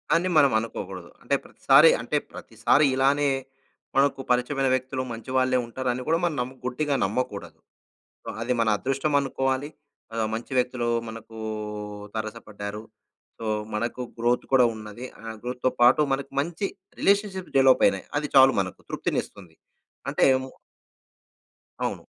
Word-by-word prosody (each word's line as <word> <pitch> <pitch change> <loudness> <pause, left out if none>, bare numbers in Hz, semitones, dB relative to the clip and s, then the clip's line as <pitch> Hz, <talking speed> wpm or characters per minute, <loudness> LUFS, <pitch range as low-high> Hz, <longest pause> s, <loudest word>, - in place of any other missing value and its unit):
అని 170 +2 +2
మనం 140 -3 +6
అనుకోకూడదు. 95 -5 -6
అంటే - - +1
ప్రతిసారి, - - +6
అంటే - - -1
ప్రతిసారి 145 +1 +2
ఇలానే 140 +2 +3 0.7
మనకు 135 0 +3
పరిచయమైన 130 +2 +1
వ్యక్తులు 130 0 -1
మంచి 115 +3 -8
వాళ్ళే 130 0 +3
ఉంటారు 125 +2 -3
అని 125 - -5
కూడా 165 +1 +3
మనం 165 -4 +1
నమ్ము 130 +2 -5
గుడ్డిగా 140 +3 0
నమ్మకూడదు. 105 0 -4 0.8
అది 120 +2 0
మన 115 - +2
అదృష్టం 135 +6 -1
అనుకోవాలి. 135 0 -1 0.5
ఆహ్, 115 -1 0
మంచి 115 +4 -6
వ్యక్తులు 125 -1 0 0.2
మనకు 110 0 -10 0.8
తారసపడ్డారు. 105 -1 -6 0.6
సో, 115 - -4 0.3
మనకు 120 +3 -2 0.2
గ్రోత్ 120 +1 +1
కూడా 130 -2 +6
ఉన్నది, 110 +2 -9 0.2
ఆహ్, 115 -1 -7
గ్రోత్‌తో 125 +1 -1
పాటు 125 +5 +6
మనకు 135 0 -2
మంచి 170 +6 -2 0.3
రిలేషన్‌షిప్ 200 -2 +1
డెవలప్ 135 -1 +6
అయినాయి. 250 - 0
అది 150 0 -3
చాలు 135 0 +8
మనకు 95 -1 -4
తృప్తినిస్తుంది. 90 -5 -4 0.5
అంటే - - +2 1.6
అవును. - - -3
130 Hz, 130 wpm, -25 LUFS, 115-140 Hz, 1.6 s, చాలు